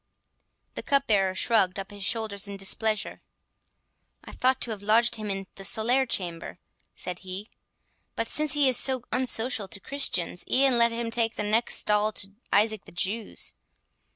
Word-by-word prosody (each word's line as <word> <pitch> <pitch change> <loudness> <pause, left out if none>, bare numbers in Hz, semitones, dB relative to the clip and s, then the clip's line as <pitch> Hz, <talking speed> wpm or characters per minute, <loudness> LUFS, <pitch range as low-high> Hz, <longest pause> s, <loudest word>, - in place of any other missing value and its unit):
The - - -5
cupbearer 210 -10 +1
shrugged 190 -1 +2
up 195 +1 -6
his 205 -1 -8
shoulders 210 -2 -2
in 200 0 -7
displeasure. 215 +2 -1 1.0
"I - - -11
thought 260 +1 +1
to 235 - -1
have 210 -2 -6
lodged 225 +3 +3
him 215 -1 -5
in 195 0 -3
the 195 - -10
solere 245 +6 +3
chamber," 175 -2 -4 0.4
said 180 -1 -6
he; 190 +2 -7 0.7
"but 230 - -2
since 305 +4 +1
he 290 -2 +4
is 255 - +5
so 260 -3 +4
unsocial 245 -3 0
to 205 0 -6
Christians, 185 -9 +1
e'en 260 -2 +4
let 235 0 +4
him 230 0 -4
take 225 -1 0
the - - -2
next 220 +3 +1
stall 210 +1 +1
to 195 -1 0 0.2
Isaac 215 0 +2
the - - -13
Jew's. 200 +5 -3
220 Hz, 165 wpm, -26 LUFS, 195-235 Hz, 1.0 s, is